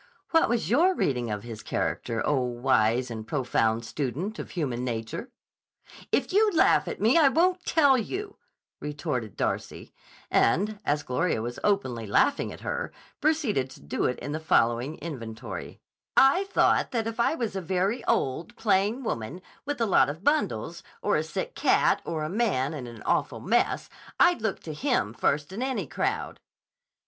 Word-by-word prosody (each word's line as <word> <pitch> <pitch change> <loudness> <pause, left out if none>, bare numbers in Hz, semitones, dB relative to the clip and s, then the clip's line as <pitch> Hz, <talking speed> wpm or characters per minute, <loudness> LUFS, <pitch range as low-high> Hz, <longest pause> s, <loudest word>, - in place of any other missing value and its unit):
"What 325 - +4
was 235 -8 0
your 350 +9 +4
reading 125 - 0
of 105 -1 -3
his 115 -3 -8
character, 115 -1 -2
oh, 145 -3 +2
wise 120 -1 +1
and 110 -1 -6
profound 115 -4 0
student 150 - -3
of - - -6
human 130 -8 -2
nature?" 115 - -4 0.8
"If - - +1
you 425 +2 +5
laugh 320 - +4
at - - -4
me 230 +10 +4
I 300 - +6
won't 360 +4 +2
tell 285 -5 +5
you," 395 - -5 0.4
retorted 145 - -4
Darcy, - - -3 0.4
and, 200 - +2
as 150 +1 +1
Gloria 125 +3 0
was 120 +3 -4
openly 130 - 0
laughing 275 - +2
at - - -10
her, 485 0 -3 0.3
proceeded 280 - +1
to - - -13
do 70 - -2
it 125 - 0
in 145 - -6
the 155 - -2
following 125 -1 +1
inventory: 115 -9 -7 0.4
"I 280 +9 +6
thought 395 - +2
that 230 -3 -1
if 225 0 -5
I 235 +7 +3
was 230 -9 -3
a 190 - -2
very 190 +6 0
old, 165 - 0
plain 210 +4 +1
woman 115 - -3 0.3
with 290 -2 -2
a 230 - +2
lot 195 - +4
of 160 +6 -7
bundles, 300 +4 0 0.2
or - - +2
a - - +2
sick - - -4
cat, - - +3
or 160 -2 -2
a - - -1
man 180 - 0
in 135 -5 -6
an 115 -2 -10
awful - - 0
mess, - - +1 0.3
I'd 350 -8 +5
look 220 -4 -2
to 155 - -6
him 245 - 0
first 145 +8 0
in 215 - -4
any 260 0 -1
crowd." - - -2
165 Hz, 170 wpm, -27 LUFS, -, 0.8 s, I